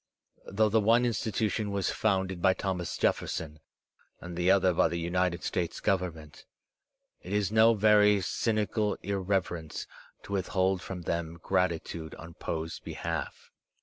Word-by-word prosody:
Though 105 +2 +2
the 110 +1 +3
one 115 +4 +4
institution 110 -3 -1
was 100 -2 -1
founded 95 -4 0
by 95 0 +4
Thomas 90 -3 -3
Jef - - +3
ferson 75 -1 -5 0.6
and 85 0 -8
the 90 +1 +1
other 95 -1 +4
by - - +3
the 85 - -3
United 85 +1 0
States 85 -2 -2
Government, 85 -5 -2 0.8
it 90 - -9
Is 105 -1 +1
no 110 +1 +6
very 105 -1 +5
cynical 105 +2 0
irreverence 95 -5 -2 0.4
to 100 - -7
withhold 95 -1 +1
from 90 -2 -6
them 85 0 -3
gratitude 85 -2 -1
on 85 0 -11
Foe's 80 -1 -4
behalf. - - -5
95 Hz, 140 wpm, -29 LUFS, 85-105 Hz, 0.8 s, no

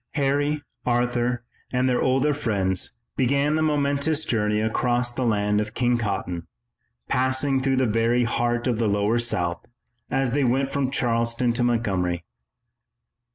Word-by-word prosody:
Harry, 145 +1 +1 0.2
Arthur, 120 0 0 0.3
and 125 0 +1
their 125 -1 +1
older 135 +3 +2
friends 100 -10 -1 0.2
began 140 +3 +2
the 155 - +1
momentous 150 0 +1
journey 105 -2 +1
across 120 +2 0
the 125 - -4
land 105 -2 +1
of 110 0 -6
King 120 -1 +2
Cotton, 95 -6 -3 0.6
passing 130 +1 +1
through 135 0 +1
the 130 0 +2
very 115 +2 +2
heart 120 +1 0
of 120 -3 0
the 115 - +2
lower 105 +3 +1
South, 90 -7 -1 0.5
as 135 -2 0
they 140 +2 +1
went 135 +2 +1
from 135 -2 -1
Charleston 115 -2 0
to 120 - -2
Montgomery. 95 -8 0
120 Hz, 145 wpm, -24 LUFS, 110-135 Hz, 0.6 s, older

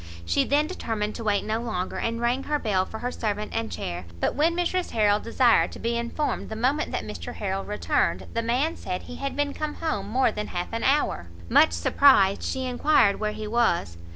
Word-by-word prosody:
She 85 - +2
then 290 +2 +2
determined 220 - -3
to 230 - -6
wait 205 -2 +1
no 220 +1 -1
longer, 185 -6 -3
and 230 0 -2
rang 240 +3 +1
her 295 - 0
bell 195 -8 0
for 220 - -7
her 245 +2 -3
servant 210 -3 -3
and 225 0 -2
chair; 90 0 -5
but - - 0
when 325 +4 +2
Mrs 355 +1 0
Harrel 210 -2 +3
desired 230 +1 +3
to - - -9
be 235 +1 -1
informed 235 +6 -2
the 220 - -5
moment 260 +7 0
that - - -3
Mr 100 -5 -7
Harrel 195 -1 -2
returned, 210 - 0
the 230 - 0
man 255 +8 0
said 180 - -5
he 245 - -9
had 275 0 -4
been 290 0 0
come 305 -1 -4
home 210 -12 -2
more 255 +3 +2
than 210 - -4
half 175 +4 -4
an 230 - -2
hour. 270 - +1 0.2
Much - - +6
surprised, 195 - +4
she 260 -1 -2
enquired 250 -4 +3
where 210 0 -1
he 215 - -6
was. 210 - +1
230 Hz, 210 wpm, -25 LUFS, 205-270 Hz, 0.2 s, Much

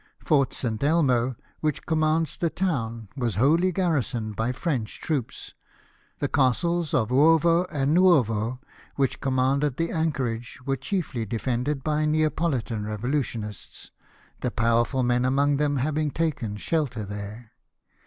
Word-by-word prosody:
Fort 140 -5 +2
St. 115 -1 -3
Elmo, 130 -6 +2 0.2
which 155 -3 -2
commands 155 -1 +1
the 170 - 0
town, 115 - -2
was 120 -7 -1
wholly 160 - +3
garrisoned 135 - -1
by 115 +4 0
French 130 -5 -3
troops; 140 -7 -3 0.6
the - - -1
Castles 160 +5 +1
of 110 -3 +1
Uovo 165 +5 +4
and 145 -1 +1
Nuovo, 125 - +3 0.4
which 135 -2 0
commanded 135 +1 +1
the 165 0 -1
anchorage, 130 -8 -2
were 135 0 +1
chiefly 135 - -3
defended 125 +5 -2
by 155 0 +1
Neapolitan 150 -7 0
revo 110 +5 -3
lutionists, 110 - -4 0.5
the 125 - -1
powerful 115 +3 +1
men 125 0 +2
among 140 +2 +2
them 145 -1 +1
having 150 +3 0
taken 140 -9 -2
shelter 125 -2 -1
there. 105 +3 -8
135 Hz, 130 wpm, -25 LUFS, 115-155 Hz, 0.6 s, Uovo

